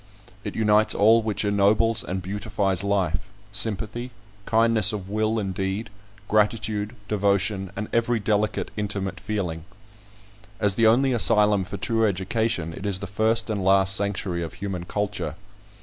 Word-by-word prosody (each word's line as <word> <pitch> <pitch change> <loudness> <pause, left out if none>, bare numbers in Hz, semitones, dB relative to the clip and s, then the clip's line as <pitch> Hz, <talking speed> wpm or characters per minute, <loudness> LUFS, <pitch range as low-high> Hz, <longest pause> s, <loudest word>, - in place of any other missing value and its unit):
It - - -6
unites 110 -1 +4
all 115 +3 +5
which 110 -1 -2
ennobles 105 +2 +3
and 95 0 -4
beautifies 100 -1 -2
life, 95 -3 -1 0.2
sympathy, 110 +3 +1 0.4
kindness 115 -2 +3
of 100 -3 -6
will 110 +2 0
and 100 -3 -2
deed, 95 +3 -3 0.4
gratitude, 105 0 0
devotion, 100 -1 0
and 105 +1 -4
every 115 0 +1
delicate, 105 0 -1
intimate 100 -2 -3
feeling. 90 -7 -4 1.0
As 100 -2 +2
the 115 +3 +3
only 130 +4 +3
asylum 105 -4 +4
for - - -6
true 115 -1 +1
education, 95 -2 -1
it 95 +4 -6
is 100 -2 0
the 100 - -5
first 110 +3 +1
and 105 -3 -2
last 95 0 +3
sanctuary 95 -3 -2
of 80 - -6
human 95 -3 -5
culture. 100 -6 -3
105 Hz, 145 wpm, -24 LUFS, 95-110 Hz, 1.0 s, all